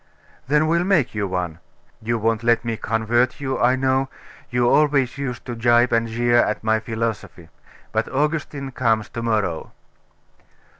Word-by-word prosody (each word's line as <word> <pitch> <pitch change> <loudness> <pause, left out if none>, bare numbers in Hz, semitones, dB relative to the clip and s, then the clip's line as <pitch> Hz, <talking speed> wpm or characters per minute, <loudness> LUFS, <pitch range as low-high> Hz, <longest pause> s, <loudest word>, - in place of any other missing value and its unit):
'Then 150 +3 +3
we'll 170 +2 +2
make 180 -8 +2
you 105 -2 -2
one. 90 -3 -3 0.4
You 115 +1 -1
won't 115 0 0
let 120 0 +2
me 115 -1 -1
convert 115 +4 0
you, 135 -2 -2
I 125 +2 +4
know; 130 0 +1 0.4
you 120 0 +1
always 140 -2 +2
used 125 -4 -4
to 125 - -5
gibe 120 +1 +3
and 115 0 +2
jeer 120 +1 +1
at 110 -3 +1
my 110 0 +2
philosophy. 110 -6 -4 0.4
But 110 0 -1
Augustine 145 -1 -2
comes 115 -4 0
to 115 - -6
morrow. 105 -8 -1
120 Hz, 155 wpm, -22 LUFS, 110-130 Hz, 0.4 s, I